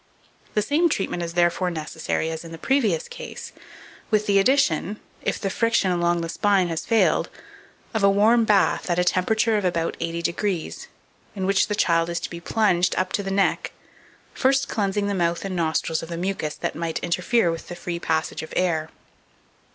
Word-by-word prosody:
The 210 - +2
same 315 +9 +2
treatment 195 - -2
is 170 -1 -4
therefore 175 +1 +2
necessary 160 0 -3
as 160 0 -5
in 165 - -10
the 165 - -7
previous 215 - +1
case, 485 0 -8 0.6
with 215 -2 +2
the 200 -1 +4
addition, 210 - +2 0.2
if - - -2
the 195 - -2
friction 230 -4 +2
along 175 -1 +1
the 165 - -4
spine 195 -1 +2
has 165 -1 -4
failed, 225 -1 +3 0.6
of 220 - 0
a 200 - +7
warm 220 +4 +4
bath 205 -3 +2
at 175 - +1
a 180 - +3
temperature 220 +5 +2
of 205 - -1
about 170 -2 0
80°, 170 +2 -2 0.5
in 190 -2 -2
which 195 0 +3
the 210 - -1
child 165 -3 +2
is 170 0 -2
to - - -5
be 170 - -6
plunged 180 -1 +1
up 185 0 -1
to - - +1
the 195 - -4
neck, 195 0 0 0.6
first 270 +1 +2
cleansing 200 -1 -1
the 200 - -1
mouth 170 -1 0
and 190 -1 -3
nostrils 160 -1 0
of 165 - -8
the 170 - -4
mucus 180 -4 -2
that - - -3
might 165 0 -3
interfere 180 +3 +1
with 165 - -6
the 175 - -7
free 175 0 -4
passage 160 -1 -1
of 160 - -9
air. 160 -3 0
185 Hz, 190 wpm, -24 LUFS, 170-210 Hz, 0.6 s, a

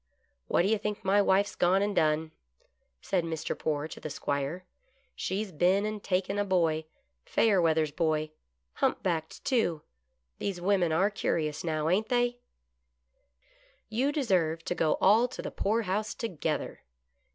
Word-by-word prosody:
" - - -47
What - - +3
do - - +2
you 220 0 +2
think 210 -1 -4
my 200 +2 +4
wife's 200 +1 +2
gone 190 +3 +3
and 205 0 -1
done? 155 0 +2 0.3
" - - -39 0.3
said 185 -3 0
Mr. 160 -2 -3
Poore 150 -1 -2
to - - -9
the 155 - -6
'Squire. 145 +5 -3 0.3
" 270 +1 -38
She's 195 +2 -3
been 185 +5 +2
and 215 -1 -3
taken 190 +2 0
a - - +3
boy 165 -5 +1 0.2
— 65 -1 -49
Fayerweather's 165 -8 +3
boy 155 -1 0 0.2
— 65 0 -51
humpbacked, 165 -4 -1
too. 200 - +1 0.6
These 195 -3 -3
women 180 -2 +2
are 190 +6 +2
curious 155 -7 -1
now, 155 -2 -1
ain't 200 +6 +1
they 245 0 +1 0.5
" 60 0 -48
" - - -33 0.3
You 250 +6 +1
deserve 180 - 0
to - - -1
go 160 -3 +1
all 220 +5 +5
to 250 - -7
the - - -4
poorhouse 210 0 -1
together." 190 -10 -3
180 Hz, 165 wpm, -29 LUFS, 155-205 Hz, 0.6 s, all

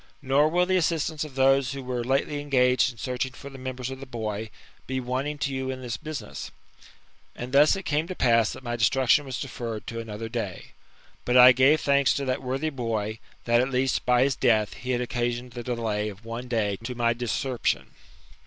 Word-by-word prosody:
Nor 140 +3 +3
will 175 +2 +2
the 185 +1 +2
assistance 160 -2 0
of 150 -4 -9
those 135 0 +3
who 135 -1 -6
were 125 -1 -3
lately 135 +3 0
engaged 130 -2 +3
in 120 - -18
searching 125 +1 -3
for 140 +3 -10
the 135 - -10
members 130 0 -5
of 130 - -7
the 135 - -9
boy, 110 -3 -4 0.4
be 130 0 -2
wanting 130 +4 -2
to 140 -2 -2
you 130 0 -3
in 130 0 -5
this 120 -2 -3
business." 155 -1 -6 0.9
And 125 +1 -6
thus 145 +5 +6
it 195 - -5
came 155 +1 0
to 185 - -5
pass 115 -5 +3
that 130 - -11
my 120 -1 -3
destruction 130 +5 +3
was 130 -2 -5
deferred 115 -5 -5
to 115 - -5
another 115 0 -6
day. 115 -6 -5 0.5
But 125 +1 +2
I 125 0 +10
gave 135 +5 +4
thanks 140 -1 +3
to 140 - -2
that 130 0 -1
worthy 135 +4 -2
bo>% 110 -4 -3 0.3
that 120 0 +4
at 130 - 0
least, 130 0 0
by 125 0 +4
his 135 -1 +1
death, 110 -4 +2
he 125 - -9
had 125 -1 +1
occasioned 120 0 -2
the 120 0 -6
delay 115 -3 -2
of 105 +2 -12
one 115 +2 -6
day 105 -5 0
to 125 +2 -5
my 120 -1 +2
discerption. 125 +2 -1
125 Hz, 210 wpm, -26 LUFS, 120-135 Hz, 0.9 s, I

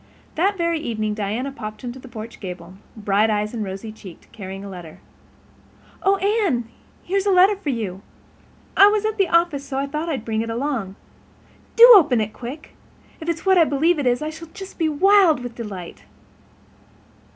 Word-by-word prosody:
That 390 +5 +1
very 335 -2 0
evening 215 -7 -3
Diana 215 +6 -3
popped 215 -3 -8
into 245 +1 -6
the 260 - -13
porch 230 -1 -9
gable, 180 -2 -8 0.2
bright 210 +1 +1
eyed 210 +1 -1
and 225 -2 -3
rosy 195 +3 -6
cheeked, 195 -5 -14
carrying 195 -1 -8
a - - -7
letter. 175 -5 -10 1.0
"Oh, 390 +1 +3
Anne, 390 - 0 0.4
here's 390 +2 -1
a - - +4
letter 380 +3 +5
for 385 -7 -5
you. 205 -7 -3 0.7
I 400 - +8
was 420 0 +1
at 435 -1 -2
the 390 - +3
office, 335 -4 +1
so 275 -1 -5
I 275 - 0
thought 300 +4 -4
I'd 265 -8 -3
bring 220 -1 -1
it 230 - -4
along. 230 -5 -3 0.8
Do 470 +1 +10
open 285 - +5
it 215 0 -2
quick. 260 +6 -9 0.4
If 325 0 -5
it 335 - +1
is 330 - -15
what 380 -1 +5
I - - +7
believe 310 +3 +1
it 275 - 0
is 245 +3 +1
I 310 - -3
shall 320 +1 -10
just 390 -3 -10
be 320 -2 +2
wild 360 -1 +4
with 245 -1 -7
delight." 200 -7 -8
265 Hz, 190 wpm, -21 LUFS, 215-340 Hz, 1.0 s, Do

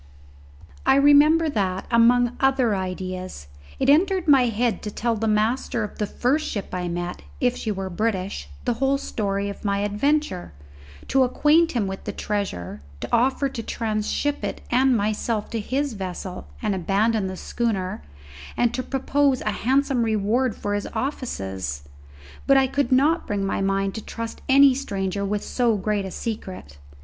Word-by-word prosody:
I - - +4
remember 290 +3 +6
that, 195 -9 -1
among 240 +1 +4
other 265 -5 +3
ideas, 185 - -5 0.3
it - - 0
entered 360 +5 +3
my 270 -4 +6
head 230 +1 0
to 210 - -4
tell 230 +3 -1
the 225 +1 -1
master 220 +2 +1
of 210 - -7
the 210 - 0
first 290 +9 0
ship 200 -3 -5
I 180 -1 -2
met, 175 +1 -4 0.2
if 250 -1 +2
she 220 - -3
were 195 -1 -3
British, 190 - -2 0.2
the 245 - +2
whole 270 +1 +3
story 200 -6 -2
of 200 - -7
my 200 -1 0
adventure, 205 - 0 0.6
to 270 - +3
acquaint 300 +6 +3
him 235 -5 0
with 190 0 -6
the - - -2
treasure, 190 - -4 0.2
to - - -5
offer 260 +4 +2
to 245 - -5
tranship 225 +6 -2
it - - -3
and 255 0 +4
myself 215 +1 -1
to 230 - -2
his 270 +5 -1
vessel 185 -2 -6 0.2
and 210 -2 +1
abandon 200 +3 +1
the 185 0 -6
schooner, 195 - -2 0.6
and 240 -1 +2
to 255 - -1
propose 270 +1 +1
a 215 - -1
handsome 265 +3 +1
reward 225 +2 +1
for 205 - -3
his 205 0 -2
offices. 95 - -3 0.6
But 275 - +6
I 270 - +5
could 270 -1 -1
not 295 +6 +3
bring 200 -2 -1
my 195 - -1
mind 195 0 0
to 220 - -5
trust 230 +2 -6
any 275 0 +7
stranger 200 -7 -3
with 205 +1 -2
so 235 -4 +1
great 205 0 -1
a - - -4
secret. 185 - -6
220 Hz, 165 wpm, -24 LUFS, 195-265 Hz, 0.6 s, any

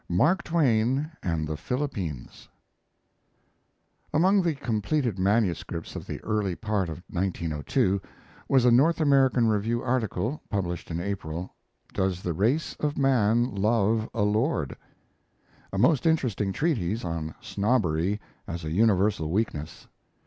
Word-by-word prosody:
MARK 150 - +3
TWAIN 135 -2 +2
AND 80 -3 -1
THE 80 - -3
PHILIPPINES 95 - -4 1.6
Among 190 +5 +4
the 170 -4 0
completed 120 -2 -1
manuscripts 95 -4 0
of - - -7
the - - -5
early 105 -4 -1
part 105 -4 -1
of 80 +2 -7
1902 90 +1 0 0.5
was 130 -2 +4
a 125 - +6
North 150 +9 +4
American 135 -5 +4
Review 110 +2 0
article 120 0 -1
(published 90 -4 -3
in 85 0 -3
April) 90 -2 -4 0.4
"Does 95 -1 -1
the 85 - -1
Race 120 - 0
of 150 -1 -1
Man 120 -2 +2
Love 110 +2 +1
a 115 - 0
Lord?" 105 - 0 1.0
a 95 - -3
most 130 - +3
interesting 120 - +1
treatise 110 - -1
on 80 -2 -4
snobbery 100 -4 0 0.3
as 85 -1 -5
a 80 - -3
universal 100 -3 +2
weakness. 85 -4 -2
105 Hz, 125 wpm, -27 LUFS, 90-130 Hz, 1.6 s, a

